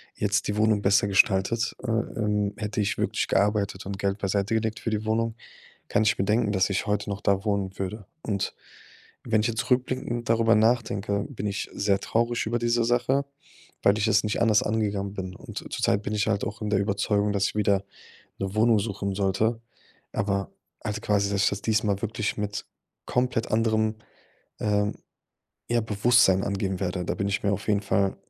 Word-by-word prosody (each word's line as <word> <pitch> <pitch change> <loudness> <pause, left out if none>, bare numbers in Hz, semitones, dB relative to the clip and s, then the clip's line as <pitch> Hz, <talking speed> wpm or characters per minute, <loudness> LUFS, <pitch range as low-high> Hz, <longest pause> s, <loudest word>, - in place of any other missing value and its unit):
jetzt 105 +1 0
die 105 - -2
Wohnung 110 -1 +3
besser 100 0 +3
gestaltet, 100 +3 +2
äh, - - -2
ähm, 105 -2 0
hätte 105 -2 -2
ich 105 0 -1
wirklich - - 0
gearbeitet 100 -1 +1
und 95 0 -5
Geld 100 0 0
beiseite 100 +2 0
gelegt 110 -1 -1
für - - -2
die 110 0 -2
Wohnung, 110 +1 0 0.5
kann - - +2
ich 110 - +3
bedenken, 105 +2 +1
dass 95 0 +2
ich 100 - -1
heute 105 0 -1
noch 100 0 -4
da 100 0 +1
wohnen 100 -3 -1
würde. 100 +1 -4 0.2
Und 100 -3 -2 0.7
wenn 110 -2 +2
ich 110 - +1
jetzt 115 0 -1
zurückblickend 125 -2 -1
darüber 115 0 +4
nachdenke, 105 -3 +1
bin 115 -7 -5
ich 100 -1 -3
sehr 100 -1 +2
traurig 115 +3 0
über 120 +2 0
diese 120 0 +1
Sache, 125 +4 +2 0.6
weil 100 +1 +4
ich 110 - +1
es 105 -1 +3
nicht 105 - -1
anders 110 -2 +4
angegangen 100 -2 -1
bin. 95 -2 -5
Und - - -7
zur - - -10
Zeit 100 - +2
bin 105 - -3
ich 105 -1 +1
halt 100 -2 +1
auch 105 +1 -6
in 105 - -2
der 100 - +3
Überzeugung, 100 0 +1
dass 100 -1 +1
ich - - -4
wieder 100 -2 +2 0.6
'ne 95 0 -3
Wohnung 110 +1 +4
suchen 100 -2 -3
sollte. 105 +4 0 0.5
Aber 100 -1 -1 0.3
halt 105 0 -3
quasi, 100 -1 +2
dass 100 -1 +1
ich - - +4
das 100 - -4
diesmal 105 -3 +1
wirklich 110 -1 -2
mit 105 0 -3 0.4
komplett 125 -2 0
anderem, 110 -1 +2 0.6
ähm, 105 -1 +1 0.7
ja, 120 0 +2
Bewusstsein 105 -2 +4
angehen 95 -2 -2
werde. 90 -1 -2
Da - - -1
bin 100 -2 -1
ich 100 - -1
mir 100 - +2
auf 100 - -5
jeden 105 -2 +2
Fall 100 -1 +1
105 Hz, 190 wpm, -26 LUFS, 100-110 Hz, 0.7 s, darüber